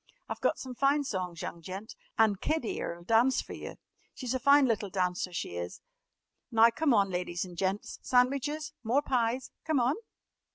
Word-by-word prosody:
I've - - -5
got - - +2
some 260 -1 -6
fine 275 +3 +2
songs, 180 -8 -4
young 170 - -6
gent. 190 +6 -7 0.2
And 215 -3 +3
Kid 315 -5 0
'ere 170 - -3
'll - - -14
dance 230 +7 +4
fer - - -5
yer. - - -7 0.4
She's 255 -2 -3
a 260 - 0
fine 280 +2 +6
little 215 -4 0
dancer, 180 -1 -1
she 85 - -4
is! 85 0 -5 0.7
Now, 230 0 +6
come 310 +4 +1
on, 200 -4 +3
ladies 180 0 -2
an' 180 -1 -10
gents, 190 +3 -2
sandwiches? 280 +4 +1
More 250 +5 +2
pies? 250 -1 0
Come 315 -4 +1
on!" 245 +3 +3
230 Hz, 180 wpm, -30 LUFS, 185-265 Hz, 0.7 s, fine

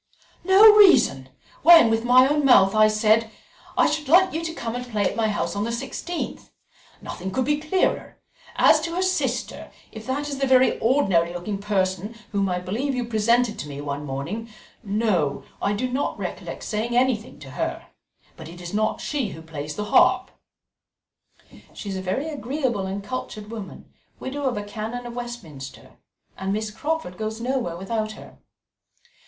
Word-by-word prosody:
"No 395 +4 +8
reason! 360 - +5 0.3
when 325 -8 +8
with 225 0 +1
my 250 +2 +6
own 295 +1 +1
mouth 195 -8 +6
I 215 0 +5
said, 215 +1 +2 0.5
'I - - +5
should 300 -1 -2
like 360 +6 +5
you 325 +1 -3
to 325 - -3
come 230 -6 -4
and 245 0 -4
play 215 -4 -2
at - - -1
my 225 -1 +1
house 205 - -2
on 205 - -1
the 230 - -2
sixteenth.' 270 +8 -5 0.5
Nothing 185 - -6
could 245 +7 -1
be 295 0 +1
clearer. 315 +5 -1 0.4
As 305 - +5
to 335 +1 -4
her 365 - 0
sister, 370 0 -2 0.2
if 220 0 -10
that 285 +3 -2
is 280 -2 -5
the 275 - +1
very 260 0 +4
ordinary 195 -10 +2
looking 195 +3 -4
person 195 +1 -1 0.2
whom 200 -1 0
I 180 - -1
believe 225 +10 -2
you 245 -1 -2
presented 230 0 +1
to 150 - -5
me 140 -1 -7
one 145 0 -4
morning, 150 +12 -5 0.3
no, 200 -9 0 0.2
I 200 - +1
do 240 +5 -1
not 255 +3 -2
recollect - - -6
saying 230 +3 -2
anything 250 -3 0
to - - -12
her; - - -4 0.5
but 160 -2 -10
it 175 +1 -11
is 175 +1 -8
not 215 +1 0
she 280 -6 -2
who 160 - -11
plays 150 -2 -6
the 210 - -3
harp." - - +4 1.4
"She 205 - -7
is 195 - -3
a 190 - -3
very 190 +11 -2
agreeable 260 -7 -2
and 195 +1 -5
cultured 215 -1 -6
woman, 215 -4 -8 0.3
widow 280 +2 -5
of 250 -4 0
a 205 - -3
Canon 220 +4 -6
of 240 - -7
Westminster, 175 - -8 0.5
and 190 0 -2
Miss 215 +1 -2
Crawford 290 - -4
goes 220 +1 -4
nowhere 240 -8 -2
without 215 +3 -3
her." - - -14
225 Hz, 180 wpm, -23 LUFS, 195-260 Hz, 1.4 s, No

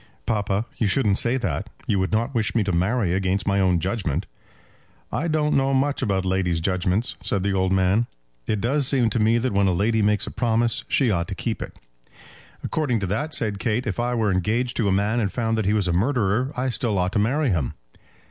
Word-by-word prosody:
"Papa, 105 0 0
you 110 - +1
shouldn't 105 -3 +2
say 120 +3 +1
that. 115 -4 -3 0.2
You 100 -3 +1
would 95 0 -1
not 115 +5 0
wish 110 -3 -1
me 115 - +3
to 100 - -1
marry 95 +2 +1
against 95 +1 0
my 100 0 +2
own 90 -2 +3
judgement." 95 -5 -2 0.9
"I 165 - -1
don't 155 -2 +1
know 135 0 +2
much 140 +2 +1
about 95 -6 0
ladies' 90 -3 0
judgements," 90 +5 0
said 100 -2 -1
the 100 0 0
old 95 -1 +1
man. 95 +5 +2 0.4
"It 105 - 0
does 135 +3 +1
seem 125 -5 +2
to 115 - 0
me 110 +2 +3
that 120 -1 -1
when 100 0 +3
a - - +3
lady 110 +5 +1
makes 105 0 +2
a - - -6
promise 115 -1 0
she 130 -5 +2
ought 85 -3 0
to - - -5
keep - - -3
it." - - -7 0.9
"According 150 -7 0
to - - 0
that," 145 - -2
said 105 -3 -1
Kate, 115 +3 -1
"if 105 -1 -3
I 120 +1 0
were 110 -3 +1
engaged 110 +7 0
to 115 - +1
a - - +2
man, 105 +5 +1
and 100 -4 0
found 115 -2 -1
that 110 -2 -1
he 100 - +2
was 105 -4 +1
a 85 - +1
murderer, 115 +4 +1
I 130 +1 0
still 115 -4 -1
ought 90 0 +1
to - - 0
marry 130 +5 +1
him." 80 -9 -1
105 Hz, 225 wpm, -23 LUFS, 95-120 Hz, 0.9 s, me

